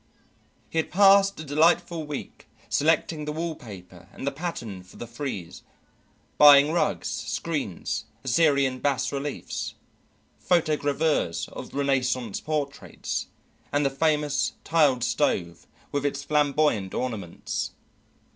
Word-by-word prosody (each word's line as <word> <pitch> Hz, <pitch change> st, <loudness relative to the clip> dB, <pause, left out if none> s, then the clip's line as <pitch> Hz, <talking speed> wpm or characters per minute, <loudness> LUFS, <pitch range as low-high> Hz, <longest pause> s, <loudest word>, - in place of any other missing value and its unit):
He 165 Hz, -, 0 dB
had 160 Hz, -, -1 dB
passed 195 Hz, 0 st, +5 dB
a -, -, -5 dB
delightful 160 Hz, +2 st, +2 dB
week 145 Hz, -2 st, -7 dB, 0.2 s
selecting 155 Hz, 0 st, +1 dB
the 150 Hz, -, -3 dB
wall 165 Hz, +2 st, -3 dB
paper 95 Hz, -, -12 dB
and -, -, -8 dB
the 140 Hz, -, 0 dB
pattern 130 Hz, -, -5 dB
for 90 Hz, +1 st, -17 dB
the -, -, -6 dB
frieze, 120 Hz, -, -6 dB, 0.8 s
buying 145 Hz, 0 st, +8 dB
rugs, 170 Hz, -1 st, 0 dB
screens, 145 Hz, -, -3 dB, 0.2 s
Assyrian 140 Hz, -1 st, +2 dB
bas 135 Hz, -1 st, 0 dB
reliefs, 140 Hz, 0 st, -4 dB, 0.7 s
photogravures 155 Hz, -, +1 dB
of -, -, -9 dB
Renaissance 130 Hz, -5 st, 0 dB
portraits, 150 Hz, -3 st, -3 dB, 0.4 s
and 145 Hz, 0 st, +1 dB
the 135 Hz, -, +2 dB
famous 150 Hz, 0 st, +1 dB
tiled 145 Hz, -7 st, +3 dB
stove 85 Hz, 0 st, -1 dB, 0.2 s
with 145 Hz, -1 st, -1 dB
its 140 Hz, -1 st, -2 dB
flamboyant 145 Hz, -9 st, +1 dB
ornaments. 110 Hz, -9 st, -4 dB
145 Hz, 115 wpm, -26 LUFS, 125-155 Hz, 0.8 s, buying